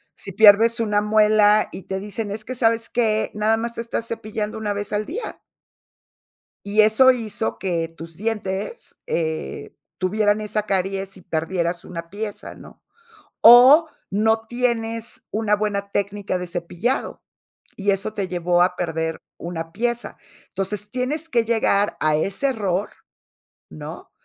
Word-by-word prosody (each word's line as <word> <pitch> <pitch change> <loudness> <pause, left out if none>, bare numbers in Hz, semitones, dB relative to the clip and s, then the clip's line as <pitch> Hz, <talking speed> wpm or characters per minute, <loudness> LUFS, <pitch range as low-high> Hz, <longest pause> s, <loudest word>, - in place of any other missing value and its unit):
Si 195 - -6
pierdes 220 +4 +6
una 210 -2 +1
muela, 210 0 +4
y 190 - -8
te 190 0 -4
dicen: 210 +1 -5
"Es 215 +1 -6
que, 255 - -5
¿sabes 230 -1 +1
qué? 220 -2 +1
Nada 215 +1 +2
más 235 +1 -4
te - - -3
estás 230 0 -4
cepillando 215 -1 -4
una 210 -2 -2
vez 205 +1 -4
al 210 +1 0
día". 385 - -6 1.2
Y 205 +2 +3
eso 220 +5 +6
hizo 225 -3 -3
que 170 -4 -1
tus 165 0 -12
dientes, 210 - -4
eh, 160 - -3 0.2
tuvieran 205 +3 +1
esa 210 0 -2
caries 195 0 -2
y 185 - -14
perdieras 170 +1 -2
una 170 -1 -7
pieza, 210 +2 -6
¿no? - - -15 0.6
O, 260 +8 +9 0.2
no 220 +2 +2
tienes 230 -2 -2
una 210 0 +1
buena 200 -1 -2
técnica 200 -1 -2
de 180 0 -5
cepillado, 175 +8 -3 0.5
y 200 0 +1
eso 200 +2 -2
te 200 -3 -3
llevó 175 -1 +1
a 180 0 0
perder 160 -2 -2 0.2
una 165 -1 -6
pieza. 240 +4 -2 0.3
Entonces, 200 +1 -3
tienes 275 +7 -3
que 235 -6 +2
llegar 215 -3 +1
a 155 -1 +2
ese 195 - -1
error, 205 -6 -1 0.8
¿no? - - -9
210 Hz, 145 wpm, -22 LUFS, 190-225 Hz, 1.2 s, O